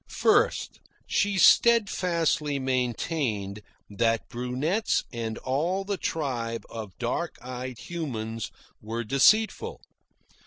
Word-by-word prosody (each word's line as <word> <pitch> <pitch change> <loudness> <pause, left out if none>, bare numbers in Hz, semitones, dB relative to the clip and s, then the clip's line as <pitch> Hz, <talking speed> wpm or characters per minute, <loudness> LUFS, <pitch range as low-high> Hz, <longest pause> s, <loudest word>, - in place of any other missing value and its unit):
First, - - +2 0.3
she 205 -1 +1
steadfastly 170 -9 +4
maintained 125 -5 -1 0.3
that 115 +2 0
brunettes 130 - 0
and 115 -1 -3
all 165 +9 -1
the 200 +1 -2
tribe 120 - -2
of 110 -5 -7
dark 135 +7 -2
eyed 125 0 -6
humans 115 -9 -4 0.3
were 115 +2 -4
deceitful. 165 - +3
130 Hz, 90 wpm, -27 LUFS, 115-170 Hz, 0.3 s, steadfastly